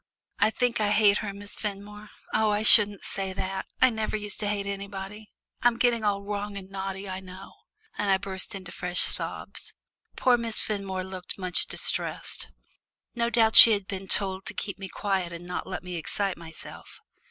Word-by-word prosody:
I - - +4
think 240 0 -1
I 210 - +1
hate 210 -1 +4
her, 210 -2 -4
Miss 200 +1 -9
Fenmore. 210 0 -7 0.2
Oh, 220 0 +2
I 210 +1 0
shouldn't 205 -2 +8
say 195 -1 -3
that 190 0 -4 0.2
I 255 - +6
never 220 -1 -2
used 210 -1 -6
to 210 - -2
hate 205 -1 -2
anybody. 200 +1 -7 0.3
I'm 240 -1 +3
getting 235 -2 +1
all 200 -1 0
wrong 205 0 -5
and 190 -1 -10
naughty, 195 0 -5
I 185 0 -5
know," 185 0 -12 0.5
and 205 - 0
I 190 - +4
burst 190 +2 -5
into 185 -3 -9
fresh 180 0 -1
sobs. - - -2 0.4
Poor 245 -2 +3
Miss 230 -1 +1
Fenmore 195 -3 -3
looked 185 -1 -7
much 185 -2 -1
distressed. - - -2 0.7
No 235 -1 0
doubt 220 -1 +2
she 230 - +11
had 200 -2 -2
been 195 -1 -6
told 190 0 +2
to - - -4
keep 200 - -5
me 195 -1 -7
quiet 190 -4 -2
and 170 +1 -9
not 180 0 -5
let - - -6
me 180 0 -6
excite 195 +4 +1
myself. 165 -1 -11
200 Hz, 185 wpm, -26 LUFS, 190-210 Hz, 0.7 s, she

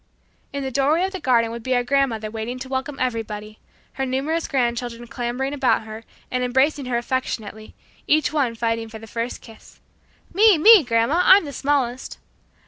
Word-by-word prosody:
In 280 0 -4
the 265 - -4
doorway 285 +7 +2
of 380 - -1
the 380 - -6
garden 235 -6 +2
would 235 0 -6
be 255 +2 -1
our 245 - +1
grandmother 245 -5 0
waiting 225 +3 -5
to 260 +1 -7
welcome 265 +2 -4
everybody, 215 -4 -4 0.3
her 270 - -3
numerous 275 +6 -1
grandchildren 240 -2 -2
clambering 245 +3 -3
about 270 -5 +1
her 220 +1 -10 0.3
and 250 0 -1
embracing 265 +3 +1
her 245 -1 0
affectionately, 225 -3 -4 0.3
each 310 0 +2
one 265 -6 0
fighting 230 0 -2
for 220 - -9
the 220 - -11
first 230 +2 -5
kiss. 225 -2 -16 0.5
"Me, 415 0 +6
me, 415 +2 +8
grandma; 240 +7 +1
I'm 385 -2 +6
the 285 - -7
smallest." 265 -3 -1
255 Hz, 175 wpm, -22 LUFS, 230-280 Hz, 0.5 s, me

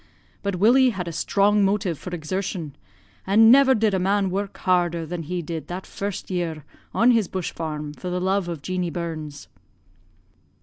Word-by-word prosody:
But 200 -1 -2
Willie 245 +8 +5
had 190 -6 -4
a - - -3
strong 200 +5 +2
motive 195 -5 0
for - - -7
exertion 175 -2 -4 0.5
and 225 +3 +6
never 265 0 +6
did 215 -3 +2
man 195 +1 +1
work 200 +1 -3
harder 175 -3 +1
than 175 +1 -5
he 175 +2 -4
did 160 0 -5
that 180 +2 -6
first 200 -1 -5
year 165 -5 -3 0.3
on 240 +2 +4
his 225 -5 +2
bush 185 -3 -4
farm, 150 -2 -5
for 180 +4 -6
the 180 0 -1
love 190 0 0
of 165 -5 -5
Jeanie 180 0 -2
Burns.' 160 -4 -6
180 Hz, 170 wpm, -23 LUFS, 170-200 Hz, 0.5 s, and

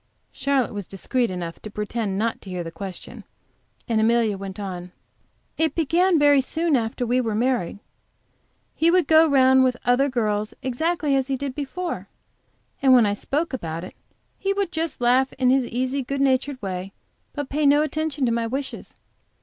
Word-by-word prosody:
Charlotte 275 -5 0
was 205 -3 -5
discreet 240 +5 -1
enough 175 -2 -5
to 215 - -7
pretend 210 -1 -3
not 225 +2 -1
to 195 - -11
hear 180 -1 -3
this 165 0 -8
question, 185 +2 -7 0.6
and 225 -3 +1
Amelia 225 -2 +2
went 195 +1 -7
on: 180 -3 -6 0.7
"It 320 -1 +1
began 340 +3 +3
very 290 -2 +5
soon 320 +4 0
after 235 0 -1
we 250 +2 +2
were 225 -3 -2
married. 240 -5 0 1.0
He 325 - +2
would 360 -1 +4
go 320 +2 +6
round 260 -1 +5
with 255 -1 +1
other 250 +3 +3
girls 215 -4 -1
exactly 295 +3 0
as 265 -1 +1
he 270 -1 -1
did 275 -1 -4
before; 320 +6 -4 0.7
then 265 -1 +6
when 245 -3 +6
I 205 - +1
spoke 290 +9 -2
about 165 -8 -4
it 185 - -9 0.5
he 395 0 0
would 395 -3 -1
just 325 -6 -3
laugh 255 +2 +3
in 255 -1 +2
his 260 -2 +2
easy, 260 +3 -1
good 275 +2 -4
natured 270 0 +1
way, 190 0 -4 0.4
but 290 -2 -4
pay 295 +1 +1
no 290 +2 +5
attention 310 -2 -1
to 235 - +1
my 230 0 0
wishes. 270 +3 -5
255 Hz, 180 wpm, -23 LUFS, 215-285 Hz, 1.0 s, go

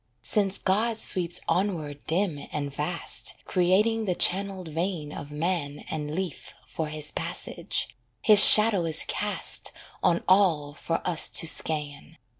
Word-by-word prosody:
Since 200 -2 0
God 220 +4 -1
sweeps 180 -5 -3
onward 160 -7 -3
dim 165 -3 -2
and 145 -2 -5
vast, 160 +5 -2
Creating 210 +5 0
the 180 -3 -2
channelled 190 -1 0
vein 165 -1 -4
of 145 - -9
Man 150 -1 -4
And 150 -1 -5
Leaf 185 -5 -6
for 160 - -6
His 150 0 -7
passage, - - -4 0.4
His 210 -1 +9
shadow 210 -5 +8
is 160 -1 +4
cast 210 +1 -2 0.3
On 175 -2 0
all 170 -7 +2
for 165 +4 -5
us 170 -3 +3
to 165 - +3
scan. 150 0 0
170 Hz, 135 wpm, -25 LUFS, 150-195 Hz, 0.4 s, His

